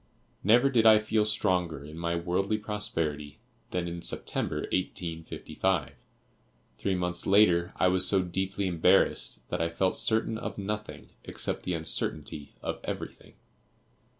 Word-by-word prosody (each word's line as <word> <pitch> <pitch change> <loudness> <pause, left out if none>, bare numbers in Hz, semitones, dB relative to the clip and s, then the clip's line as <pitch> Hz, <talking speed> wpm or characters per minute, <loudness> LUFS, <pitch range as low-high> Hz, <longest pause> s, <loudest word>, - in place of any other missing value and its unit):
Never 120 +7 +5
did 115 -3 +4
I 110 -1 +9
feel 110 0 +1
stronger 90 -8 0
in 75 +1 -10
my 85 +1 -2
worldly 90 +5 0
prosperity 80 -9 -3 0.3
than 90 -1 -2
in 85 0 -5
September, - - -3
1855. 85 -2 -2 0.9
Three 95 - 0
months 90 -1 -1
later, 90 -4 +4
I - - +3
was 90 0 +3
so 95 -2 +3
deeply 95 +3 -2
embarrassed 85 -3 +2
that - - -2
I 85 - +1
felt 95 +3 0
certain 110 0 +1
of - - -5
nothing, 105 +1 -5
except - - -3
the 90 - -1
uncertainty 80 -2 -2
of - - -3
everything. - - -7
90 Hz, 135 wpm, -29 LUFS, 85-105 Hz, 0.9 s, I